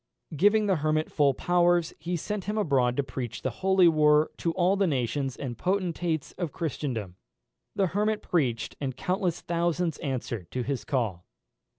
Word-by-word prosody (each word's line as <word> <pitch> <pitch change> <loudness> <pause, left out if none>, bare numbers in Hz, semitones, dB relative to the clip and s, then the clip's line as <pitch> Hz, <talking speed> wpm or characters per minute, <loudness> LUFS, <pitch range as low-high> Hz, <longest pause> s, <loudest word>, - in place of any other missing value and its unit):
Giving 205 +7 +4
the 190 -3 +2
Hermit 155 +1 0
full 140 -3 +3
powers, 175 0 +2
he 175 +1 -3
sent 210 +3 -4
him 210 +1 -2
abroad 130 - +2
to 140 - +2
preach 125 -3 -6
the 130 - 0
holy 190 -1 +5
war 150 -1 +4
to 170 - -1
all 185 +2 +2
the 195 -1 +2
nations 135 -1 -1
and 130 -4 -5
potentates 175 -5 -1
of 175 -5 -2
Christendom. 125 - -4 0.6
The 195 - +2
Hermit 210 +1 0
preached, 130 -9 0
and 130 -2 -3
countless 180 +1 -1
thousands 170 -1 -1
answered 120 - -4
to 125 - -1
his 135 -1 -3
call. 110 -10 -2
155 Hz, 165 wpm, -27 LUFS, 130-180 Hz, 0.6 s, holy